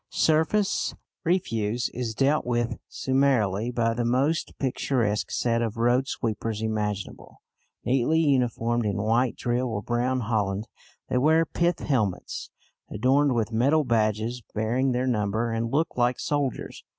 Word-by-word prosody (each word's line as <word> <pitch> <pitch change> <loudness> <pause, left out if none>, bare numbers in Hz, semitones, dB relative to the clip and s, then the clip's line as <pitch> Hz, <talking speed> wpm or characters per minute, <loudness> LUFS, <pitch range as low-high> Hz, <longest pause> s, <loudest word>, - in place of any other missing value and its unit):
Surface 160 +6 +1 0.3
refuse 120 - 0
is 115 -3 -3
dealt 140 +4 +2
with 120 -1 -1
summarily 125 -6 +1
by 115 -2 0
the 120 +1 -1
most 135 +7 0
picturesque 125 -5 0
set 115 -1 0
of 115 -1 -2
road 120 +3 +2
sweepers 110 -2 -3
imaginable. 105 -3 -4 0.4
Neatly 135 +5 +2
uniformed 120 -5 +1
in 105 -3 -1
white 115 +3 +2
drill 120 +1 -1
or 105 -3 -3
brown 125 +2 0
holland, 105 -2 -1 0.4
they 125 - +1
wear 160 +4 +4
pith 170 +2 0
helmets 110 -10 -2 0.4
adorned 135 +3 +2
with 115 0 0
metal 140 +8 +3
badges 115 0 0
bearing 120 +5 +1
their 125 +1 0
number, 110 -1 0
and 115 0 -1
look 155 +6 0
like 125 0 +1
soldiers. 145 -4 -2
120 Hz, 135 wpm, -26 LUFS, 110-135 Hz, 0.4 s, wear